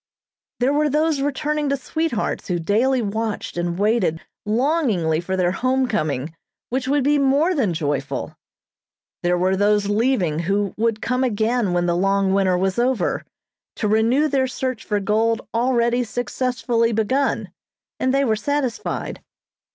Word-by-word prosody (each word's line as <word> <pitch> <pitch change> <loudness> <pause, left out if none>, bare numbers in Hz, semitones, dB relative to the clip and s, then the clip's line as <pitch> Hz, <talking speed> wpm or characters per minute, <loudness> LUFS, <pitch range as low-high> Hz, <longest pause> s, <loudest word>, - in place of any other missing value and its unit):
There 255 +3 +2
were 300 +1 +2
those 305 0 +1
returning 295 +1 -1
to 280 - +1
sweethearts 305 -2 -2
who 180 - 0
daily 230 +9 +1
watched 220 +1 -3
and 175 0 -2
waited 205 -5 +1 0.3
longingly 220 - +1
for 190 +2 -3
their 180 -1 +2
home 260 +5 +1
coming 155 - -2 0.4
which 260 +1 -1
would 285 0 +2
be 290 +1 +3
more 280 +6 +3
than 250 - +1
joyful. 145 -3 -3 0.9
There 175 0 +1
were 185 +2 +2
those 205 +1 +2
leaving 205 - +1
who 200 +3 0
would 225 -1 -1
come 255 +1 0
again 225 -2 +1
when 175 0 +1
the 170 -1 +1
long 195 +1 +2
winter 190 -2 +2
was 190 +4 0
over, 245 -6 0 0.5
to 215 - -1
renew 230 +8 +3
their 270 -3 +1
search 255 -2 -3
for 210 -1 -1
gold 220 +3 0
already 240 0 +2
successfully 245 0 -1
begun; 260 +6 0 0.5
and 255 - +1
they 275 +1 +2
were 220 -3 +2
satisfied. 260 +2 -3
230 Hz, 150 wpm, -21 LUFS, 195-265 Hz, 0.9 s, be